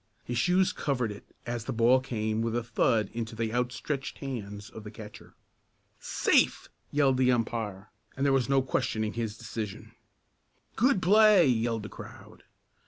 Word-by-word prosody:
His 120 0 -2
shoes 180 +6 +3
covered 125 -6 -1
it 105 - -10 0.2
as 120 -2 -4
the - - -3
ball 120 +2 +4
came 110 -4 -2
with 115 0 -1
a 120 - 0
thud 115 -2 +1
into 115 -1 -4
the 115 0 -2
outstretched 130 +3 -2
hands 105 -7 -6
of 110 - -10
the 105 - -8
catcher. 105 -1 -12 0.6
"Safe!" - - +1 0.2
yelled 140 -3 +2
the 130 -1 +4
umpire, 110 -5 -2 0.3
and 135 - 0
there 140 - +3
was 135 -1 +1
no 135 -1 +3
questioning 115 -5 -1
his 115 -2 -3
decision. 110 -3 -6 0.8
"Good 240 -6 +2
play!" 210 0 +6
yelled 115 -3 0
the 105 - -7
crowd. - - -12
120 Hz, 160 wpm, -28 LUFS, 110-135 Hz, 0.8 s, play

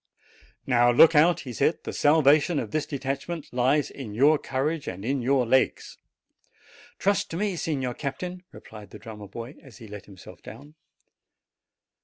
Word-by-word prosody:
"Now 120 -2 +3
look 160 +7 +7
out!" 165 +3 +4
he 125 -3 -8
said; 140 +7 0
"the - - -6
salvation 150 +1 +3
of 115 -6 -3
this 155 -2 -2
detachment 140 +3 -5
lies 130 +4 +1
in 115 -7 -8
your 145 +5 +4
courage 145 +4 -3
and 95 +3 -6
in 135 +1 -1
your 130 +1 +2
legs." 130 +3 0 1.0
"Trust 200 +1 0
to 165 - -5
me, 200 -1 -1
Signor 135 -7 -2
Captain," 175 +8 -6
replied 105 -2 -13
the - - -11
drummer 105 -3 -10
boy, 120 +6 -9
as 130 -6 -15
he 115 -3 -12
let 105 -1 -10
himself 95 -3 -14
down. 145 +2 -12
135 Hz, 160 wpm, -25 LUFS, 120-155 Hz, 1.0 s, look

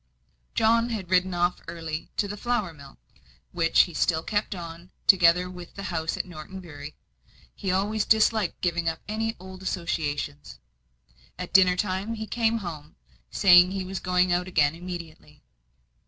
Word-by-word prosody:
John 230 +1 +3
had 200 -6 -5
ridden 185 0 +2
off 175 +1 0
early 160 -2 -5
to 205 - +1
the 205 - -5
flour 215 -5 -1
mill, 140 -3 -14 0.5
which 165 -1 +4
he 175 - -1
still 160 0 +1
kept 205 0 -1
on, 170 0 -9 0.2
together 180 -1 +5
with 180 -1 -10
the 200 - -7
house 160 -1 -2
at - - -2
Norton 180 +2 -9
Bury 150 -4 -10 0.6
he 190 - -3
always 205 +3 +1
disliked 220 -3 +2
giving 170 -2 0
up 160 - -4
any 225 +1 -2
old 185 0 -10
associations. 150 - -3 0.8
At 180 -1 -7
dinner 185 -1 +6
time 190 +4 -2
he 220 0 -5
came 230 0 +1
home, 150 -3 -8 0.3
saying 180 -1 +6
he 190 -1 -3
was 190 +1 -4
going 180 0 +2
out 180 +1 0
again 155 -5 +2
immediately. 170 -2 -9
180 Hz, 155 wpm, -26 LUFS, 165-195 Hz, 0.8 s, dinner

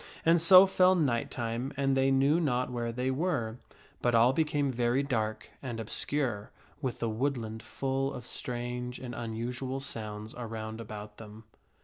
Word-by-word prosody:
And 165 0 +5
so 185 +3 +9
fell 185 -1 +4
night 130 -9 +1
time 120 +2 -3
and 135 -1 +2
they 135 0 +3
knew 135 +4 +4
not 125 -6 0
where 120 -1 -2
they 125 +3 -1
were; 130 -7 -1 0.4
but 120 -1 +2
all 120 +3 +5
became 145 -2 +1
very 120 +2 +1
dark 110 -5 -2
and 120 -4 -5
obscure, 115 -1 -1 0.3
with 130 -4 -2
the 115 - -1
woodland 110 -1 -2
full 135 +4 -2
of 125 - -7
strange 125 0 -4
and 125 -2 -7
unusual 120 +3 -4
sounds 110 -4 -5
around 110 -2 -5
about 105 -1 -8
them. 110 0 -11
125 Hz, 155 wpm, -30 LUFS, 115-135 Hz, 0.4 s, so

